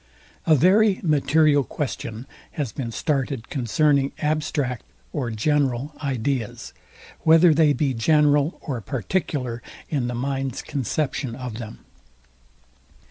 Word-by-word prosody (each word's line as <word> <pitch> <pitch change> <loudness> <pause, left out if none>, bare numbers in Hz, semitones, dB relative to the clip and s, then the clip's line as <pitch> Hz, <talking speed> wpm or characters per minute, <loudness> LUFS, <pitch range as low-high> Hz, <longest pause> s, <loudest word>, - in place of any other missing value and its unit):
A 160 - +6
very 195 - +4
material 150 -2 +3
question 120 -3 -5 0.3
has 145 -8 -3
been 115 +1 -5
started 135 -3 -2
concerning 140 +2 +1
ABSTRACT 150 -5 -1 0.3
or 120 - -2
GENERAL 135 +3 0
ideas, 130 -3 -2 0.5
WHETHER 165 +1 +6
THEY 155 -1 +4
BE 140 0 0
GENERAL 145 +4 +3
OR 130 -7 -4
PARTICULAR 125 - -2 0.3
IN 135 -6 -1
THE 125 - -3
MIND'S 135 0 -3
CONCEPTION 135 -1 -2
OF 125 -3 -6
THEM. 110 -2 -9
140 Hz, 110 wpm, -23 LUFS, 125-150 Hz, 0.5 s, A